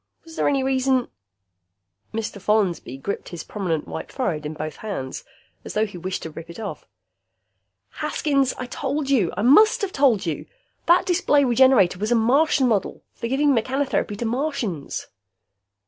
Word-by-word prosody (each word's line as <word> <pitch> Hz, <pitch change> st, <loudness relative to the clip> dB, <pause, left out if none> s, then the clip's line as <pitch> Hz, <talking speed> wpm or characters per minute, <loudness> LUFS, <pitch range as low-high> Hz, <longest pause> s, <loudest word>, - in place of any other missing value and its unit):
Was 325 Hz, -1 st, -13 dB
there -, -, +1 dB
any 275 Hz, -2 st, +1 dB
reason 260 Hz, -1 st, +1 dB, 0.5 s
" 95 Hz, +1 st, -50 dB
Mr. 215 Hz, -2 st, -4 dB
Follansby 190 Hz, -, 0 dB
gripped 200 Hz, +9 st, -5 dB
his 170 Hz, -2 st, -7 dB
prominent 180 Hz, -7 st, -3 dB
white -, -, -6 dB
forehead 160 Hz, -, -2 dB
in 155 Hz, -, -6 dB
both 155 Hz, 0 st, -5 dB
hands, 190 Hz, -12 st, -5 dB, 0.4 s
as -, -, -8 dB
though 215 Hz, +1 st, +3 dB
he 205 Hz, -, -10 dB
wished 185 Hz, +2 st, -4 dB
to 160 Hz, -, -6 dB
rip 165 Hz, +2 st, -10 dB
it 170 Hz, -, -9 dB
off. 215 Hz, -3 st, -6 dB, 1.1 s
"Haskins, 275 Hz, -3 st, +1 dB
I 255 Hz, -, -4 dB
told 275 Hz, +2 st, -3 dB
you. 215 Hz, -11 st, +3 dB
I 205 Hz, -, 0 dB
must 430 Hz, -, +6 dB
have 390 Hz, -, -1 dB
told 265 Hz, -, +3 dB
you! 160 Hz, -3 st, -3 dB, 0.4 s
That 345 Hz, +1 st, +5 dB
display 295 Hz, -5 st, +3 dB
Regenerator 240 Hz, -8 st, +4 dB
was 215 Hz, +3 st, -2 dB
a -, -, +5 dB
Martian 265 Hz, +4 st, +3 dB
model. 215 Hz, -5 st, -1 dB
For 230 Hz, -, -5 dB
giving 280 Hz, +3 st, +2 dB
mechanotherapy 255 Hz, -3 st, 0 dB
to 235 Hz, -, -3 dB
Martians." 230 Hz, -, -2 dB
225 Hz, 165 wpm, -23 LUFS, 180-270 Hz, 1.1 s, must